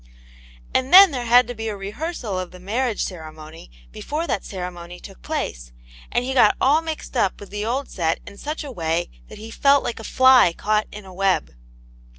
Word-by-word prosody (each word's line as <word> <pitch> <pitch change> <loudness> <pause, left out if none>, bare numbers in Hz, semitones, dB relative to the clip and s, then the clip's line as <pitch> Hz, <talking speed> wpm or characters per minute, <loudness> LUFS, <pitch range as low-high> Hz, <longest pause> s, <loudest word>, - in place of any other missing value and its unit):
And 260 +1 0
then 385 -1 +10
there 250 -3 -4
had 245 +2 +6
to 245 - -5
be 225 -1 -6
a 210 -2 -4
rehearsal 210 - -5
of 185 -1 -5
the 180 - -14
marriage 225 +5 -1
ceremohy 155 - -10 0.2
before 305 - -4
that 245 - -2
ceremony 180 -2 -7
took - - -13
place, - - -4 0.4
and 245 - 0
he 265 - -2
got 230 -5 +4
all 295 +4 +3
mixed 320 -4 -7
up 200 -6 0
with 205 - -12
the 210 +1 -4
old 265 +4 -2
set 165 -3 -1
in 200 - -12
such 300 +2 -5
a 285 - -7
way, 170 -4 -2 0.2
that 215 - -12
he 220 +2 -10
felt 280 +3 +3
like 235 - -4
a - - -9
fly 255 -6 +5
caught 215 0 0
in 210 -1 -10
a 190 - -12
web. 195 0 0
215 Hz, 200 wpm, -22 LUFS, 180-260 Hz, 0.4 s, then